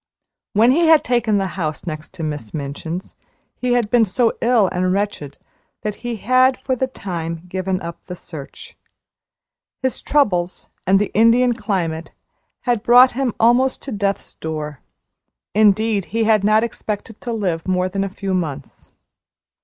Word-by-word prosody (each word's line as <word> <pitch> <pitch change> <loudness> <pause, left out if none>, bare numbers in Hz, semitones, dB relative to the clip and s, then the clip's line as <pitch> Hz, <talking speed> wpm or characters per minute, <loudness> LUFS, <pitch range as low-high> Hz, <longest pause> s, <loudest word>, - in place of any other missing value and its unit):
When 225 +4 +5
he 330 +4 +3
had 320 -2 +6
taken 240 -4 +1
the 195 - 0 0.2
house 155 0 -3
next 155 -2 -6
to 165 - -6
Miss 150 -7 -5
Minchin's 155 +5 -5 0.4
he 250 -1 -1
had 235 -4 +1
been 240 -2 +5
so 225 +3 +1
ill 230 -4 +4
and 185 0 0
wretched 195 -8 -2 0.5
that 210 -1 -3
he 240 -1 -3
had 255 +4 +3
for 260 - -2
the 260 +1 -1
time 170 -8 -5
given 185 +1 -2
up 170 0 -7
the 180 - -6
search. 155 -5 -10 1.1
His 260 - -1
troubles 185 -12 0 0.2
and 190 +1 +5
the 205 +1 0
Indian 235 +3 +4
climate 180 -8 -2 0.5
had 240 -4 0
brought 245 +3 +7
him 255 -2 -2
almost 245 +3 +3
to 275 - -6
death's 200 -2 -2
door 155 -3 -5 0.7
indeed, 215 -1 +3
he 225 +3 -1
had 215 -2 +3
not 215 +2 +4
expected 220 -1 -5
to 240 - -4
live 185 -7 -2
more 185 0 +1
than 195 +1 -2
a 195 - -3
few 195 0 -4
months. 150 -7 -4
205 Hz, 160 wpm, -20 LUFS, 175-235 Hz, 1.1 s, brought